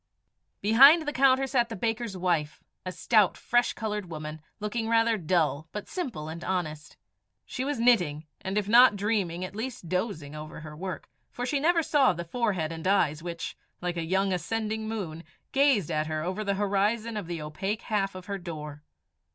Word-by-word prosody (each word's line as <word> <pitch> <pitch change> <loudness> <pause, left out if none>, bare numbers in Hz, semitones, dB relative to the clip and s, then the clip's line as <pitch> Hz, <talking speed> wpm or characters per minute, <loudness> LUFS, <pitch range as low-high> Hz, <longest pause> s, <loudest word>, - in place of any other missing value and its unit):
Behind 275 +10 +7
the 295 - -2
counter 265 0 +4
sat 245 -3 +1
the 225 - -5
baker's 225 -1 -2
wife, 170 -5 -1 0.2
a - - -2
stout, 210 0 +3
fresh 240 +1 +1
coloured 210 -4 -4
woman, 155 -1 -6 0.2
looking 225 +2 -2
rather 230 0 +3
dull, 160 -5 0
but 210 - -6
simple 245 - -4
and 165 +2 -7
honest. 160 -5 -3 0.5
She 255 - -4
was 285 -2 -2
knitting, 175 -11 +3 0.2
and 190 +2 -2
if 205 -2 0
not 235 0 +7
dreaming, 195 -4 -1
at 185 - -9
least 225 -6 -5
dozing 180 -6 -2
over 155 0 -8
her 150 -1 -9
work, 185 +3 -6 0.2
for 245 - -4
she 280 +3 0
never 330 +3 +3
saw 275 -8 +4
the 170 0 -6
forehead 185 -5 -1
and 165 +1 -5
eyes 165 -6 +2
which, 170 -1 -5 0.2
like 175 0 -3
a 170 - -2
young 190 +3 +1
ascending 220 +5 -2
moon, 170 -7 -5 0.3
gazed 270 - +3
at 155 0 0
her 155 -1 -2
over 185 +5 -2
the 200 -1 0
horizon 205 +3 0
of 205 -5 -4
the 170 -1 -4
opaque 190 +8 -3
half 195 -4 -1
of 185 -1 -8
her 200 0 -4
door. 150 -4 -7
195 Hz, 185 wpm, -28 LUFS, 165-230 Hz, 0.5 s, Behind